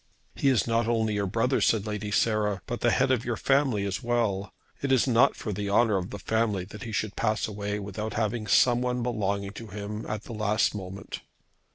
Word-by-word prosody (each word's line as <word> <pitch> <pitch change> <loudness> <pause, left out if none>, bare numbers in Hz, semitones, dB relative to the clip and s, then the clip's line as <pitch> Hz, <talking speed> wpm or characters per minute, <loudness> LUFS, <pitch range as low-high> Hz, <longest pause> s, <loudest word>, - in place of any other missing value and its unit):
"He 140 - +2
is 130 -4 +3
not 115 0 +1
only 110 -2 +1
your 100 -1 0
brother," 115 +7 +1
said 110 -3 +2
Lady 105 -1 -3
Sarah, 105 -2 +1
"but 120 - -4
the 120 - +4
head 130 +2 +2
of 125 -3 +1
your 120 -2 -2
family 135 -7 +2
as 95 -2 -2
well. 115 -5 0 0.3
It 140 - -1
is 130 -3 +4
not 125 +3 +4
for 105 - -4
the 100 +1 -3
honour 110 +1 +3
of 90 -1 -3
the - - -6
family 110 -4 0
that 105 +2 -11
he 115 - -6
should 110 -1 -2
pass 110 -1 0
away 105 -1 -3
without 105 +2 -5
having 110 0 -1
someone 125 +1 +3
belonging 100 -4 -1
to 115 +2 -9
him 105 +2 -6
at 105 0 -4
the - - -8
last 110 0 +1
moment." 95 -1 -7
110 Hz, 210 wpm, -27 LUFS, 100-120 Hz, 0.3 s, the